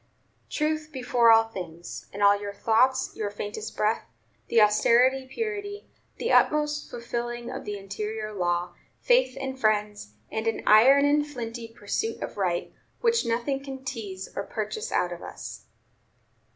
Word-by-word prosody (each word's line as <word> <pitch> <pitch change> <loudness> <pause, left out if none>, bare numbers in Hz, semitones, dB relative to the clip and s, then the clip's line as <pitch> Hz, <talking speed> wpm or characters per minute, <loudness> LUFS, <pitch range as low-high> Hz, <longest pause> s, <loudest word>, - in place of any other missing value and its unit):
Truth 310 0 -1
before 245 -3 +3
all 225 0 +7
things; 175 -4 -8
in 205 +1 -3
all 200 0 +7
your 200 -1 -5
thoughts, 255 +5 +2
your 210 -2 -2
faintest 210 +1 -6
breath, 215 +1 +1 0.4
the 235 - +3
austerest 245 +5 +4
purity, 410 -2 -4 0.3
the 470 - -1
utmost 300 0 +3
fulfilling 240 0 -4
of - - -6
the 205 -1 -4
interior 215 +2 -5
law; 175 -2 -1 0.3
faith 485 - +3
in 265 -1 -4
friends, 210 - 0 0.2
and 220 +1 -2
an 225 - -1
iron 265 +7 +7
and 295 +1 +3
flinty 235 -4 -6
pursuit 225 0 -3
of - - -6
right, 180 -3 -1 0.3
which 465 - +2
nothing 245 +4 -1
can 265 -1 -8
tease 205 -7 -5
or - - -1
purchase 455 +2 -4
out - - +1
of - - -9
us." - - -8
230 Hz, 150 wpm, -27 LUFS, 210-270 Hz, 0.4 s, all